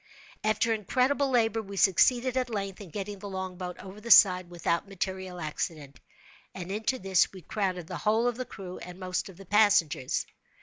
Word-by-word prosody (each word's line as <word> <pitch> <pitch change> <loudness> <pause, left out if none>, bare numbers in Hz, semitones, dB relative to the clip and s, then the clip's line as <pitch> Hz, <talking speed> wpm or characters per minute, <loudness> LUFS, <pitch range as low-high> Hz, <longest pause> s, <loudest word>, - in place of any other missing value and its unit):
After 215 +2 +2
incredible 255 +6 +1
labor 225 -3 +2
we 200 -2 -9
succeeded, 245 +7 +4
at 255 -1 0
length, 195 -3 -4
in 195 - -10
getting 200 +3 -5
the 200 +1 -7
longboat 185 -1 -5
over 195 +2 -11
the 235 - -8
side 185 -5 +7
without 170 +1 -1
material 190 -1 -4
accident, 150 -3 -5 0.6
and 185 0 -6
into 220 +5 -1
this 190 -5 +2
we 185 -3 -12
crowded 185 -3 -2
the - - -6
whole 220 +2 +2
of 245 - 0
the 255 - -3
crew 190 -6 -9
and 180 +1 -10
most 185 +1 -3
of 185 - -13
the 195 - -12
passengers. 200 -10 +2
195 Hz, 180 wpm, -28 LUFS, 180-220 Hz, 0.6 s, side